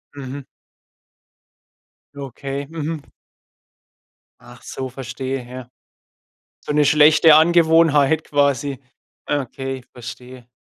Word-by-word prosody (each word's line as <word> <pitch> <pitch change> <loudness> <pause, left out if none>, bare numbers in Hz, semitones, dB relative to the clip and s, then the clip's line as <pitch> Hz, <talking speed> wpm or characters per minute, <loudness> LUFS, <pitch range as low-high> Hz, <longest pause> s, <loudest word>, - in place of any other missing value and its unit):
Mhm. 140 0 -7 1.7
Okay. 140 +1 -6
Mhm. 160 -1 -6 1.3
Ach 120 +1 -16
so, 130 0 -6
verstehe. 130 0 -6
Ja. 125 0 -10 1.0
So - - -3
'ne 150 0 +3
schlechte 150 +2 +6
Angewohnheit 160 -2 +4
quasi. 140 -1 0 0.5
Okay, 135 -2 -4
verstehe. 125 0 -11
140 Hz, 80 wpm, -20 LUFS, 130-150 Hz, 1.7 s, schlechte